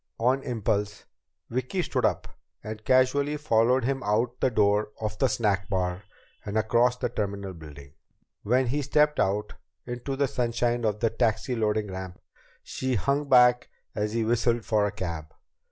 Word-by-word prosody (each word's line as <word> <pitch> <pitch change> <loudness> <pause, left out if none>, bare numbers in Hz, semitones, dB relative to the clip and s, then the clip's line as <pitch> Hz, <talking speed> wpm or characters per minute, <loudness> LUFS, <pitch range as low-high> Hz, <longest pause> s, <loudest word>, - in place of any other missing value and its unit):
On 130 +4 +2
impulse, 105 -4 -2 0.5
Vicki 130 +10 -1
stood - - 0
up - - 0 0.4
and 110 0 -7
casually 135 +4 +2
followed 125 -2 +2
him 135 +2 -1
out 120 +3 0
the - - +2
door 105 -2 +2
of 110 -1 -3
the 135 - +4
snack 100 -5 0
bar 90 -2 -1 0.4
and 105 +1 -3
across 120 +3 +2
the - - -1
terminal 100 -4 -4
building. 75 -4 -12 0.5
When 125 +5 +2
he 140 +5 -1
stepped 150 +2 +2
out 105 +2 0 0.3
into 125 +3 -4
the 140 0 +1
sunshine 120 -1 -1
of 105 -1 -1
the 115 - +2
taxi 115 +2 0
loading 105 -2 0
ramp, 95 -1 -7 0.4
she 130 -1 -2
hung 140 +8 0
back 125 -1 +5 0.2
as 105 0 -2
he 115 -1 0
whistled 120 0 +1
for 105 -2 +2
a - - -3
cab. 85 -6 -6
115 Hz, 160 wpm, -27 LUFS, 105-125 Hz, 0.5 s, back